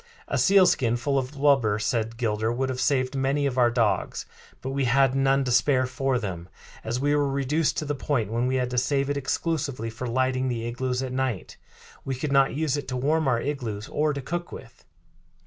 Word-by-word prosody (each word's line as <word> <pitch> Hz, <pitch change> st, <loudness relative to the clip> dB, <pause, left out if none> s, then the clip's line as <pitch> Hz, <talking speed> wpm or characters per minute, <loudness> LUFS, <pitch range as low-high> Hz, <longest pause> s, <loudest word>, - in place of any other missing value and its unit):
"A -, -, -1 dB
sealskin 180 Hz, -, +4 dB
full 135 Hz, +3 st, 0 dB
of 130 Hz, +2 st, -5 dB
blubber," 135 Hz, -7 st, +3 dB
said 115 Hz, +1 st, -1 dB
Gilder, 110 Hz, -1 st, 0 dB
"would 130 Hz, +2 st, -1 dB
have 130 Hz, 0 st, -3 dB
saved 130 Hz, -2 st, +1 dB
many 135 Hz, +2 st, 0 dB
of 130 Hz, -2 st, -1 dB
our 120 Hz, -1 st, +5 dB
dogs; 115 Hz, -6 st, 0 dB, 0.3 s
but 135 Hz, -, -5 dB
we 135 Hz, 0 st, 0 dB
had 135 Hz, +1 st, +3 dB
none 135 Hz, 0 st, +2 dB
to 125 Hz, -, -2 dB
spare 130 Hz, +1 st, +3 dB
for 130 Hz, +1 st, -1 dB
them, 95 Hz, -6 st, -5 dB, 0.3 s
as 115 Hz, +3 st, -2 dB
we 145 Hz, +2 st, +2 dB
were 145 Hz, -1 st, +1 dB
reduced 140 Hz, +3 st, 0 dB
to 155 Hz, -, -2 dB
the 145 Hz, -, -1 dB
point 130 Hz, -7 st, -1 dB
when 120 Hz, +2 st, 0 dB
we 130 Hz, -, 0 dB
had 125 Hz, -1 st, -1 dB
to 125 Hz, -, +2 dB
save 140 Hz, +2 st, 0 dB
it -, -, -1 dB
exclusively 140 Hz, -4 st, -2 dB
for 120 Hz, +3 st, -6 dB
lighting 130 Hz, +1 st, 0 dB
the 115 Hz, -2 st, -2 dB
igloos 125 Hz, +2 st, -2 dB
at 130 Hz, -1 st, -4 dB
night. 130 Hz, -8 st, -3 dB, 0.5 s
We 135 Hz, -, -3 dB
could 140 Hz, +3 st, -3 dB
not 135 Hz, -1 st, +3 dB
use 150 Hz, -2 st, 0 dB
it 145 Hz, -, -5 dB
to 125 Hz, -, -3 dB
warm 155 Hz, +4 st, +1 dB
our 120 Hz, -3 st, +2 dB
igloos 115 Hz, -7 st, -4 dB
or 150 Hz, 0 st, +1 dB
to 140 Hz, -2 st, -5 dB
cook 175 Hz, +5 st, -4 dB
with. -, -, -12 dB
130 Hz, 215 wpm, -25 LUFS, 120-140 Hz, 0.5 s, our